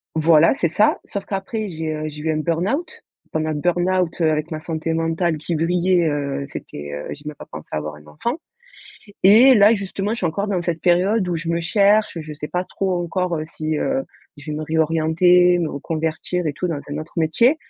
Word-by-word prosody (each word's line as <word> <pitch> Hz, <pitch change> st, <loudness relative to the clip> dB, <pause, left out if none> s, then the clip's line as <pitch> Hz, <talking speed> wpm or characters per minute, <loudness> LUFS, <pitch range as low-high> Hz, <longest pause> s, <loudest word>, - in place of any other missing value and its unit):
Voilà 160 Hz, 0 st, +5 dB
c'est 170 Hz, -11 st, 0 dB
ça. 210 Hz, +6 st, +3 dB
Sauf 200 Hz, -1 st, -5 dB
qu'après 205 Hz, +2 st, -3 dB
j'ai, 160 Hz, -2 st, -4 dB
heu, 155 Hz, 0 st, -4 dB
j'ai 150 Hz, -1 st, -7 dB
eu 160 Hz, -, +1 dB
un 155 Hz, -, -1 dB
burn-out. 175 Hz, -, -2 dB, 0.3 s
Pendant 155 Hz, 0 st, -1 dB
le -, -, -2 dB
burn-out, 175 Hz, +2 st, 0 dB
heu, 160 Hz, -1 st, +4 dB
avec 155 Hz, +2 st, -2 dB
ma 155 Hz, -, -3 dB
santé 160 Hz, 0 st, -3 dB
mentale 165 Hz, 0 st, 0 dB
qui 155 Hz, +3 st, -4 dB
vrillait, 175 Hz, +1 st, +2 dB
heu, 140 Hz, -1 st, -2 dB
c'était, 75 Hz, -, -8 dB
heu, 75 Hz, 0 st, -5 dB
j'ai 145 Hz, -, -13 dB
même 150 Hz, 0 st, -6 dB
pas -, -, -11 dB
pensé 80 Hz, -, -10 dB
à -, -, -1 dB
avoir 75 Hz, 0 st, -5 dB
un 75 Hz, 0 st, -16 dB
enfant 235 Hz, -, -3 dB, 0.9 s
et 230 Hz, +8 st, +8 dB
là, 210 Hz, -1 st, +6 dB
justement, 200 Hz, 0 st, -3 dB
je -, -, -2 dB
suis 180 Hz, -, 0 dB
encore 185 Hz, +6 st, -2 dB
dans 195 Hz, -4 st, -1 dB
cette 170 Hz, -1 st, -2 dB
période 185 Hz, +4 st, +3 dB
où 175 Hz, -, -1 dB
je 165 Hz, 0 st, -4 dB
me 170 Hz, 0 st, 0 dB
cherche, 200 Hz, +2 st, +3 dB
je 155 Hz, -1 st, -8 dB
sais 150 Hz, +1 st, -6 dB
pas 180 Hz, +1 st, -2 dB
trop 185 Hz, -2 st, -2 dB
encore, 180 Hz, +1 st, -1 dB
heu, 155 Hz, -, -3 dB
si, 155 Hz, -1 st, -3 dB
heu, 270 Hz, -, 0 dB, 0.3 s
je 145 Hz, +2 st, -9 dB
vais 150 Hz, -, -3 dB
me 155 Hz, -, -4 dB
réorienter, 165 Hz, +3 st, +3 dB
me 165 Hz, -3 st, -1 dB
reconvertir 160 Hz, +4 st, -3 dB
et 150 Hz, -, 0 dB
tout 180 Hz, +5 st, -3 dB
dans 155 Hz, -4 st, -3 dB
un 145 Hz, -, -3 dB
autre 155 Hz, +1 st, -8 dB
métier 170 Hz, -, +3 dB
165 Hz, 220 wpm, -21 LUFS, 155-185 Hz, 0.9 s, et